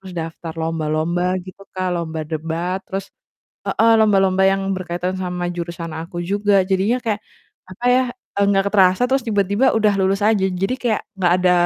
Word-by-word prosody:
terus 190 -1 -10
daftar 165 0 -5
lomba-lomba 160 +2 -1 0.2
gitu 185 +1 -12 0.2
Kak, 185 0 -1
lomba 160 -2 -3
debat 165 +4 -2
terus 195 0 -4 0.6
heeh, 230 +1 +3
lomba-lomba 195 -3 +3
yang 195 0 0
berkaitan 180 0 -3
sama 180 -1 -3
jurusan 170 -1 -5
aku 170 +1 -8
juga, 200 +1 +2
jadinya 195 +6 +2
kayak 215 -2 0 0.5
apa 235 +7 -7
ya, 255 - +4 0.3
eee, 200 - +4
nggak 195 -1 +2
terasa 190 +3 +4
terus 270 +1 +2
tiba-tiba 205 +3 +1
udah 210 -2 +3
lulus 195 +2 +1
aja. 205 -4 +2 0.2
Jadi 195 +6 +1
kayak 230 -4 0 0.2
nggak 180 -2 +2
ada 180 0 +4
185 Hz, 165 wpm, -20 LUFS, 175-200 Hz, 0.6 s, ya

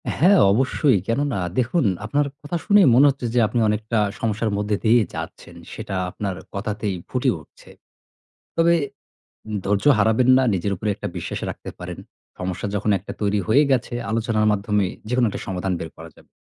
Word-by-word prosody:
হ্যাঁ, 185 +4 +5
অবশ্যই। 130 +1 +2
কেনোনা 135 -3 0 0.2
দেখুন 130 +3 +1 0.2
আপনার 145 +6 +1 0.2
কথা 155 +4 -3
শুনেই 205 -5 +6
মনে 135 - +7
হচ্ছে 135 -2 -3
যে 125 - +3
আপনি 115 +3 -1
অনেকটা 110 +2 -1 0.2
সমস্যার 110 0 -1
মধ্যে 105 0 0
দিয়ে 115 +2 +5
যাচ্ছেন। - - -8 0.2
সেটা 95 - -5
আপনার 95 0 -4 0.2
কথাতেই 100 -1 -3
ফুটে 130 +1 +1
উঠছে। 75 - -19 0.9
তবে 165 +1 +4
এ - - -6 0.8
ধৈর্য 100 0 0
হারাবেন 110 +4 +3
না, - - +3
নিজের 100 +2 -1
উপরে 105 +4 -2
একটা - - -5
বিশ্বাস 85 - -4
রাখতে - - -8
পারেন। - - -7 0.4
সমস্যা 90 +1 -3
যখন 105 +1 0
একটা 95 - -8
তৈরি 105 0 +1
হয়ে 135 +7 +5
গেছে, 130 -2 0 0.2
আলোচনার 110 -1 +1
মাধ্যমে 105 0 0 0.2
যেকোনো 125 0 +2
একটা 100 - -5
সমাধান 95 -1 -2
বের 80 - -5
করা 80 0 -11
যাবে। - - -21
110 Hz, 170 wpm, -22 LUFS, 100-130 Hz, 0.9 s, মনে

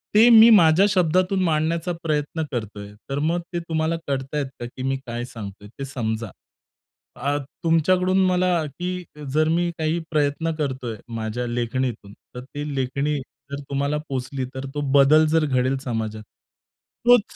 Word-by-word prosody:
ते 225 +3 +8
मी 225 0 +9
माझ्या 180 -3 +6
शब्दातून 185 +1 +2
मांडण्याचा 165 +1 0
प्रयत्न 155 +1 -1
करतोय. 105 -4 -5 0.2
तर 135 +1 -1
मग 165 +4 0
ते 175 - 0
तुम्हाला 160 -1 -1
कळत 135 +1 -3
आहेत 145 - 0
का 120 - -4
की 125 +2 -8
मी 135 +1 0
काय 120 0 -4
सांगतोय 105 -4 -9
ते 140 - -3
समजा. 115 -4 -3 0.9
आ, 145 +1 -1 0.3
तुमच्याकडून 180 +3 +3
मला 180 -2 +2
की 180 +5 -4 0.3
जर 155 +1 +3
मी 170 +1 +1
काही 160 +1 0
प्रयत्न 150 +2 +1
करतोय 130 -6 -3 0.2
माझ्या 115 +2 -3
लेखणीतून, 120 -3 -2 0.2
तर 125 - -5
ती 145 +1 -5
लेखणी 140 +3 -1 0.3
जर 140 - -4
तुम्हाला 140 +1 0
पोहोचली 130 0 -3
तर 130 +1 -4
तो 145 - -1 0.2
बदल 155 +3 +6
जर 160 0 +2
घडेल 130 -1 +1
समाजात. 110 -3 -3 0.8
तोच 245 -1 +7
145 Hz, 150 wpm, -23 LUFS, 130-165 Hz, 0.9 s, मी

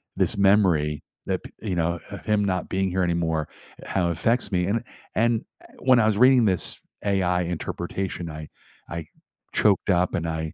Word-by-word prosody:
this - - +2
memory 90 -7 +3 0.2
that - - -1
p - - -11
you 100 -4 -2
know, 85 0 0
of 100 - -8
him 105 -1 +2
not 90 -2 -1
being 95 0 0
here 95 +1 +1
anymore, 80 -3 0 0.4
how 90 -3 0
it - - +1
affects 115 +9 +1
me 90 -2 +1
and 115 +3 0 0.3
and 115 0 +2 0.3
when 130 -2 +5
I 110 - +4
was 110 -2 +2
reading 125 0 +6
this 95 -4 +1 0.3
AI 90 -3 +2
interpretation, 85 +1 -4
I 75 0 -7 0.4
I 85 -1 -5 0.5
choked 100 -1 +2
up 90 0 +2
and 85 -3 -2
I 80 -1 -3
90 Hz, 175 wpm, -25 LUFS, 85-105 Hz, 0.5 s, reading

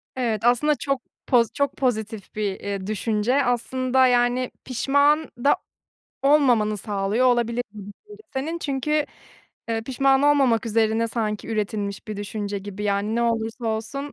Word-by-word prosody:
Evet, 230 -3 -1
aslında 270 +5 +3
çok 275 -3 -2 0.3
poz 235 -3 +3
çok 280 0 -1
pozitif 220 -6 -2
bir, 205 -3 -2
iii, 200 -1 -4
düşünce. 220 +5 +1
Aslında, 255 +2 +2
yani, 245 +1 +2
pişman 285 +4 +2
da 285 - +5 0.7
olmamanı 250 -7 +3
sağlıyor 205 +4 0
olabilir 240 -1 +2
bu 210 - -9
düşünce 420 - -16
senin. 300 +5 -2
Çünkü, 295 +1 0 0.6
eee, 225 -1 0
pişman 270 +2 +2
olmamak 270 -6 +3
üzerine 225 +1 +1
sanki 215 -2 -3
üretilmiş 205 -2 -3
bir 215 - -4
düşünce 205 0 -4
gibi, 205 +1 -7
yani, 205 +1 0
ne 235 - +1
olursa 230 +1 -1
olsun, 250 +6 -3
235 Hz, 140 wpm, -23 LUFS, 215-270 Hz, 0.7 s, da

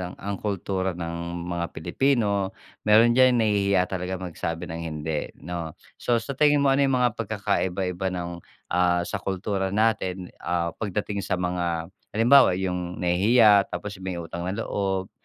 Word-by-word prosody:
ang 100 0 -4
kultura 95 -2 -2
ng 85 0 -5
mga 85 -1 -2
Pilipino, 100 - +1 0.3
meron 115 +3 +6
diyan 130 0 +5
nahihiya 100 -3 +2
talaga 95 0 -3
magsabi 85 -2 -5
ng 85 0 -5
hindi 75 -1 -3 0.2
'no. 85 -2 -5 0.2
So 120 - +1
sa 115 +4 -2
tingin 145 -1 +4
mo 135 - +4
ano 140 +1 +3
'yung 135 - +2
mga 125 -1 +3
pagkakaiba-iba 95 -4 -1
ng, 85 -1 -3 0.4
ah 90 0 +2
sa - - -4
kultura 95 0 -2
natin 95 -3 0
ah 85 -1 -1
pagdating 105 0 -2
sa 95 - -1
mga 90 -1 -2 0.2
halimbawa, 120 -3 +6
'yung 90 -1 -3
nahihiya 100 +3 +5
tapos 100 -2 -6
'yung 95 - -9
may 90 - -2
utang 85 +1 -5
na 95 - -2
loob, 95 -2 -2
95 Hz, 155 wpm, -25 LUFS, 90-105 Hz, 0.4 s, meron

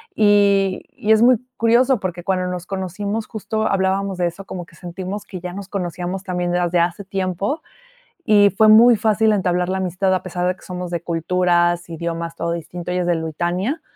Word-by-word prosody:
Y 200 -2 +3
y 215 - -1
es 220 0 +5
muy 245 0 +6 0.2
curioso 240 +2 +3
porque 175 -2 -4
cuando 185 -1 0
nos 180 -1 -4
conocimos 200 +3 -4
justo 220 0 -2
hablábamos 195 0 0
de 175 -1 +1
eso, 185 +3 -7
como 180 -2 -6
que 170 - -20
sentimos 185 +3 -6
que 185 - -8
ya 180 0 -6
nos 195 0 -7
conocíamos 185 -1 -4
también 180 -2 -2
desde 175 0 +1
hace 170 +3 0
tiempo, 195 - -2 0.6
y 205 -2 +5
fue 215 +2 +5
muy 230 +2 +8
fácil 215 0 +2
entablar 180 -2 0
la 190 - -1
amistad 190 +1 0
a 185 - 0
pesar 180 -1 -2
de 180 - 0
que - - -24
somos 180 -1 -6
de 170 -2 -2
culturas, 175 0 +1
idiomas, 165 0 -4
todo 170 0 -2
distinto. 170 +1 -5
Ella 180 0 0
es 175 - -2
de 175 - +2
Lituania, 175 - -2
185 Hz, 195 wpm, -20 LUFS, 175-200 Hz, 0.6 s, muy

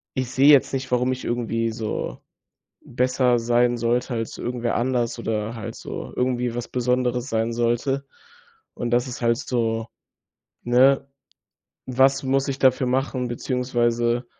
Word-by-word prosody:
ich 130 -2 -2
sehe 135 +2 +4
jetzt 140 -2 +5
nicht, 130 -1 -3
warum 125 +1 +2
ich 130 0 -4
irgendwie 115 -1 -1
so 110 -1 -4 0.7
besser 125 0 +1
sein 120 +1 +2
sollte 120 +2 0
als 115 -1 -4
irgendwer 120 -1 -2
anders 120 -1 0
oder 110 -1 -2
halt 110 -3 -6
so - - -7
irgendwie 125 -1 0
was 120 0 -4
Besonderes 125 0 0
sein 115 +1 0
sollte. 120 +4 0 0.7
Und 120 - -3
das 120 +2 +1
ist 125 - -7
halt 115 0 +2
so 115 -3 -1 0.8
ne, 135 +3 +4 0.8
was 130 +1 +3
muss 135 +1 +1
ich 135 -1 -2
dafür 130 0 +3
machen? 130 -1 -1
Beziehungsweise 120 -1 0
120 Hz, 140 wpm, -23 LUFS, 120-130 Hz, 0.8 s, jetzt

